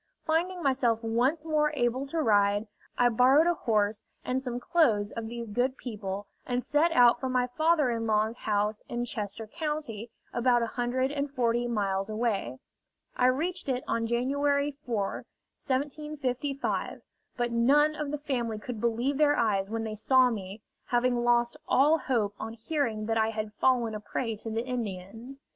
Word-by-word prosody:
Finding 345 +3 0
myself 245 -4 +1
once 250 +8 +1
more 300 -1 +2
able 255 +1 0
to 315 +2 -1
ride, 205 -1 +3 0.3
I 245 - +5
borrowed 255 +7 +5
a 345 - +3
horse 215 -7 0 0.2
and 255 +1 0
some 245 -2 -4
clothes 235 -9 +2
of 230 -1 -5
these 235 0 -6
good 245 +5 0
people, 205 -4 -5 0.2
and 245 0 -2
set 315 +3 +2
out 245 -4 +5
for 260 - -2
my 250 -1 +2
father 310 +1 +2
in 230 -1 -2
law's 215 +1 +1
house 210 -2 -1
in 240 0 -2
Chester 215 -1 -4
County, 270 - -4 0.2
about 240 0 +3
a 230 - -4
hundred 255 +2 0
and 285 0 -2
forty 240 -3 0
miles 200 -3 -1
away. 215 - -1 0.6
I 250 - +3
reached 320 +5 -1
it 255 -1 -1
on 230 0 0
January 280 +4 +1
4,1755; 275 +5 -3 0.4
but 240 -1 0
none 285 +6 +4
of 300 -1 -4
the 295 - -2
family 245 -6 -2
could 215 0 -6
believe 240 +5 0
their 295 -1 +4
eyes 200 -4 +1
when 225 0 -2
they 220 -1 -4
saw 255 +4 +4
me, 205 -1 -6 0.2
having 245 0 +1
lost 240 0 +2
all 300 +4 +4
hope 225 -8 0
on 225 +1 -5
hearing 230 -3 -2
that 225 0 0
I 220 0 +2
had 215 -1 -4
fallen 240 -1 +2
a 215 - -4
prey 225 +2 -3
to 225 - -6
the 225 +2 -2
Indians. 230 +2 -6
240 Hz, 165 wpm, -28 LUFS, 220-275 Hz, 0.6 s, I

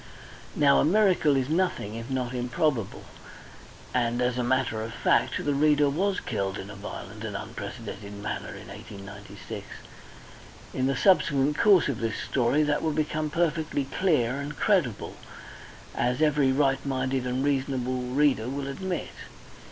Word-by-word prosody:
Now 140 -1 +5
a - - +4
miracle 180 -5 +4
is 130 -1 0
nothing 160 - 0
if 115 +2 -6
not 130 -2 -2
improbable, 125 -1 -1 0.9
and 120 -1 +1
as 125 0 +1
a - - +1
matter 125 -3 +1
of 115 +1 -6
fact - - +2
the 145 - +2
reader 145 0 +3
was 190 +6 0
killed 95 0 -2
in 100 - -7
a - - -9
violent 105 +1 -8
and 105 -3 -3
unprecedented 100 0 -7
manner 100 +1 -5
in - - -11
1896. 100 +1 -9 1.1
In 130 0 0
the 135 - +1
subsequent 150 -6 +3
course 200 -4 +6
of 140 -6 -2
this 115 -1 -2
story 135 +4 +1
that 150 0 +1
will 160 -1 0
become 155 0 -1
perfectly 155 -3 0
clear 135 -6 +1
and 145 +1 -5
credible, 170 - +1 0.8
as 125 +1 0
every 150 -3 +3
right 135 -1 +2
minded 130 -1 -1
and 130 +2 -1
reasonable 130 -2 0
reader 125 -2 +1
will 140 +1 -3
admit. 180 +5 -4
135 Hz, 150 wpm, -27 LUFS, 120-150 Hz, 1.1 s, course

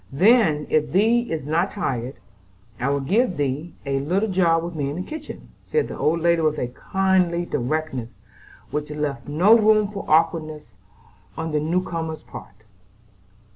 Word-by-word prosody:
Then, 175 - +4
if 150 -1 +1
thee 230 +5 +2
is 155 -4 -3
not 165 +6 0
tired, 130 - -3 0.6
I 125 - 0
will 140 0 0
give 195 - +1
thee 145 +4 -2
a 135 0 0
little 190 +9 0
job 170 -3 +2
with 175 +1 -5
me 145 -3 -2
in 145 - -4
the 180 - -4
kitchen," 310 +6 -9
said 455 - -1
the - - -7
old 165 +2 0
lady 170 0 +3
with 155 -1 +1
a 125 - -2
kindly 180 +3 0
directness 130 -3 -2 0.6
which 150 +1 -3
left 150 -2 -4
no 175 +10 +5
room 215 -2 +4
for 200 -1 -6
awkwardness 155 - +1 0.6
on 160 0 -3
the 150 - +1
new 170 +5 0
comer's 160 -3 -5
part. 105 +2 -12
160 Hz, 165 wpm, -23 LUFS, 145-190 Hz, 0.6 s, no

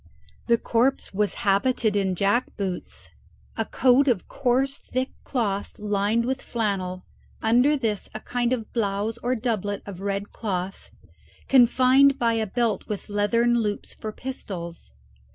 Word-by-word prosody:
The 235 -1 +4
corpse 240 +2 0
was 205 +1 0
habited 210 +2 +2
in 190 -2 +1
jackboots, 200 -2 -2 0.5
a - - -1
coat 265 +2 +3
of 235 -8 +1
coarse 270 +1 +1
thick 255 +1 -3
cloth 205 -6 -2
lined 210 +2 0
with 265 +1 -2
flannel, 190 -5 -2 0.4
under 250 +7 +4
this 220 -6 -2
a - - -3
kind 245 +1 -1
of 230 -4 -3
blouse 215 0 -1
or 245 +2 0
doublet 215 -4 -2
of 195 -2 -8
red 200 0 -3
cloth, 190 -3 -4 0.6
confined 260 +2 +5
by 235 -3 +2
a 220 -1 0
belt 230 +1 -1
with 210 0 -5
leathern 230 +4 +2
loops 210 -2 -3
for 215 - -6
pistols. 185 - -6
225 Hz, 135 wpm, -25 LUFS, 200-245 Hz, 0.6 s, confined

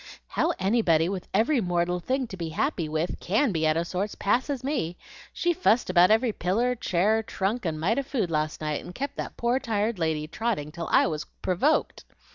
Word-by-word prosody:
"How - - +1
anybody 185 -5 +2
with 190 -2 -4
every 235 +6 +2
mortal 175 -1 0
thing 260 +8 -1
to - - -6
be 170 -3 -4
happy 170 - -1
with 160 +3 -2
CAN 220 +7 +1
be 160 -3 +1
out 155 +1 +2
of 170 - 0
sorts 190 +4 -3
passes 255 +5 0
me. 185 - -2 0.3
She 345 0 0
fussed 245 - +2
about 180 0 +6
every 225 +2 +3
piller, 225 +9 +1
chair, 215 -1 +1
trunk, 210 +2 -2
and 155 -1 -2
mite 205 - +1
of 275 - -4
food 225 - -1
last 155 0 -1
night, 150 -1 -2
and 180 - -10
kept 280 +1 -4
that - - -5
poor 240 +2 +1
tired 220 -4 -1
lady 160 -2 -1
trotting 180 -4 -2
till 170 0 -5
I - - +5
was 155 -3 -2 0.2
provoked. 225 - +1
190 Hz, 200 wpm, -26 LUFS, 165-240 Hz, 0.3 s, about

